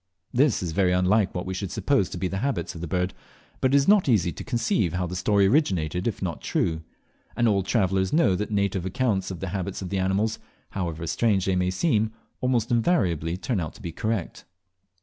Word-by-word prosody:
This 130 -5 +3
is 85 - -2
very 90 +1 +2
unlike 95 +3 +2
what 90 - -3
we 95 - -3
should 95 0 -4
suppose 135 -5 +1
to - - -6
be 90 - -1
the 95 +1 -3
habits 135 -3 -2
of 85 - -9
the 85 - -4
bird, 90 +3 -1 0.5
but 130 - +2
it - - +4
is 140 - +2
not 200 -7 +5
easy 90 -7 +3
to - - -8
conceive 115 - 0
how 90 0 -1
the 90 +1 -5
story 100 +2 +3
originated 95 - +1
if 115 - 0
it - - -24
is - - -7
not 85 -4 -3
true; 80 -1 -1 0.5
and 120 - +2
all 100 -3 +3
travellers 95 -2 +1
know 155 - +4
that 105 +3 -2
native 100 -3 0
accounts 100 -2 0
of 95 -3 -7
the 95 - -3
habits 95 +1 -4
of 95 - -6
animals, 95 +3 0 0.3
however 85 -3 -3
strange 100 +2 +1
they 95 - +1
may 90 0 +1
seem, 110 - +1 0.3
almost 125 -3 0
invariably 90 - +1
turn 110 +2 -2
out 80 -3 -4
to 110 - -14
be 85 - -4
correct. 110 +1 -3
95 Hz, 220 wpm, -25 LUFS, 90-115 Hz, 0.5 s, not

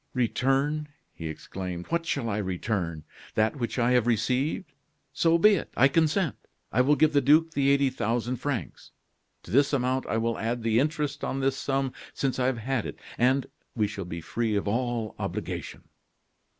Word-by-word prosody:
"Return!" 135 +5 +1 0.3
he 80 - -6
exclaimed. 90 +2 -6
"What 170 0 -1
shall 135 -7 -1
I 105 -2 -1
return? 90 -4 -2 0.3
That 110 +6 +2
which 120 -1 -3
I 120 0 +3
have 125 -2 +3
received? 130 - 0 0.4
So 165 0 +3
be 210 +5 +6
it. 195 - -1
I 135 - +7
consent. 160 +2 +1 0.3
I 125 - +3
will 145 +4 +4
give 155 0 +3
the 145 - +4
duke 155 +5 +4
the 140 -3 +2
eighty 140 -1 +3
thousand 120 +3 -1
francs; 130 -1 -4 0.5
to - - -11
this 140 +4 +3
amount 130 0 0
I - - 0
will 115 0 -1
add 115 +1 -2
the 115 0 +3
interest 150 0 -1
on 135 - -1
this 135 0 +1
sum 135 -1 -1 0.2
since 135 -2 -1
I 125 - +2
have 130 -2 0
had 120 0 -2
it, - - -7 0.2
and 130 +2 +3 0.3
we 110 -3 +2
shall 100 -2 -5
be 85 -1 -6
free 110 +6 -1
of 100 - -1
all 115 0 -1
obligation." - - -4
125 Hz, 180 wpm, -27 LUFS, 110-140 Hz, 0.5 s, I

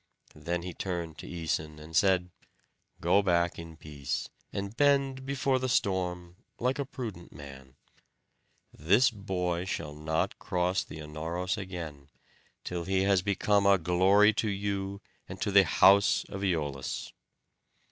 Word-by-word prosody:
Then 85 0 -3
he 90 -1 -5
turned 85 -3 -4
to - - -8
Æson, 80 -2 -3
and 80 +1 -10
said, 90 -1 +3 0.7
"Go 90 +4 +4
back 85 -3 +1
in 85 -1 -9
peace, 75 -3 -4 0.2
and 100 +2 -4
bend 135 -1 +2
before 135 -1 +1
the 130 0 -2
storm 90 -4 -1 0.2
like 130 +4 0
a 140 - -1
prudent 115 -10 -7
man. 65 -2 -12 1.0
This 100 - +4
boy 90 -4 -2
shall 80 -5 -4
not 80 +2 -2
cross 90 +1 0
the - - -10
Anauros 80 +5 -3
again, 85 -8 -7 0.5
till 85 -1 -4
he 95 0 +1
has 100 -2 +3
become 100 +1 +2
a 100 0 +6
glory 95 +5 +4
to 110 0 0
you 100 0 -3 0.3
and - - -7
to 100 - -1
the 100 -1 +7
house 100 +4 +5
of 95 - -6
Æolus." 75 -8 -2
90 Hz, 140 wpm, -29 LUFS, 85-100 Hz, 1.0 s, the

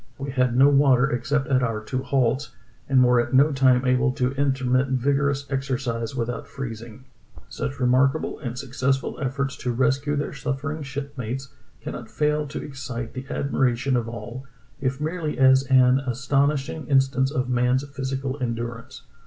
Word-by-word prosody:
We 140 0 -5
had 125 -2 +1
no 135 +2 +7
water 135 -2 +4
except 135 +4 0
at 130 -2 +3
our 115 -3 -1
two 130 +4 -3
halts, 130 +1 0 0.3
and 130 -2 +5
were 125 -1 +4
at 120 - -2
no 140 +4 +5
time 130 -2 +3
able 130 +1 +3
to 125 -2 0
intermit 135 -1 +1
vigorous 140 +2 0
exercise 130 -3 -2
without 120 0 -3
freezing. 120 -1 -8 0.2
" - - -18
Such 65 +1 -4
remarkable 130 +4 +2
and 125 -3 -5
successful 135 +1 -1
efforts 135 0 -2
to 125 - -2
rescue 140 +4 +1
their 145 +1 -2
suffering 145 +3 -3
shipmates 135 -2 -5 0.3
cannot - - -7
fail 150 0 0
to 145 - -6
excite 125 -4 -6
the 130 +1 -7
admiration 135 -1 0
of 115 -2 -1
all, 120 +3 -8 0.3
if 135 0 -2
merely 155 -2 -3
as 130 +1 +5
an 130 0 +5
astonishing 135 +3 -1
instance 135 -1 +2
of 130 -3 -1
man's 125 +2 +1
physical 135 0 -4
endurance. 115 -1 -5
130 Hz, 155 wpm, -24 LUFS, 125-140 Hz, 0.3 s, no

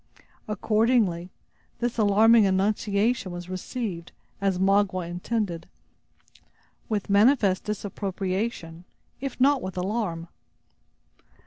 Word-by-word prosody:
Accordingly, 210 -4 +1 0.5
this 240 -1 -2
alarming 215 +1 +5
annunciation 200 +2 0
was 175 +1 -7
received, 185 -2 -5 0.3
as 195 -2 +1
Magua 190 -2 +2
intended, 175 -1 -3 1.2
with 210 -3 -2
manifest 200 -1 +3
disapprobation, 195 -3 -4 0.4
if 270 -1 -5
not 275 +1 +4
with 185 -3 -6
alarm. 180 -3 -2
200 Hz, 85 wpm, -26 LUFS, 185-225 Hz, 1.2 s, alarming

